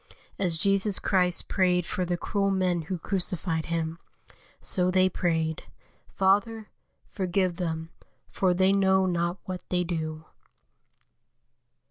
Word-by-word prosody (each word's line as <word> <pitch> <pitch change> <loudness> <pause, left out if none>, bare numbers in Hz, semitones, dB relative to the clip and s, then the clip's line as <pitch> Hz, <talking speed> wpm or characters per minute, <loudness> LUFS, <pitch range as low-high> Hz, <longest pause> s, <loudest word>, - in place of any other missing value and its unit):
As 175 -4 +1
Jesus 195 +2 +2
Christ 180 -2 +1
prayed 180 -2 +2
for 180 - -2
the 175 0 -1
cruel 195 +3 0
men 185 -3 +1
who 180 +3 -4
crucified 175 -2 -2
Him, 165 0 -2 0.6
so 180 -2 +1
they 185 0 +4
prayed: 160 -3 -1 0.4
"Father, 210 +3 +1 0.4
forgive 185 -2 0
them, 165 -2 -3 0.4
for 185 -2 +1
they 190 +1 +4
know 190 -1 +3
not 175 0 0
what 185 -1 -5
they 180 -1 +1
do." 160 -2 -4
180 Hz, 120 wpm, -27 LUFS, 170-190 Hz, 0.6 s, they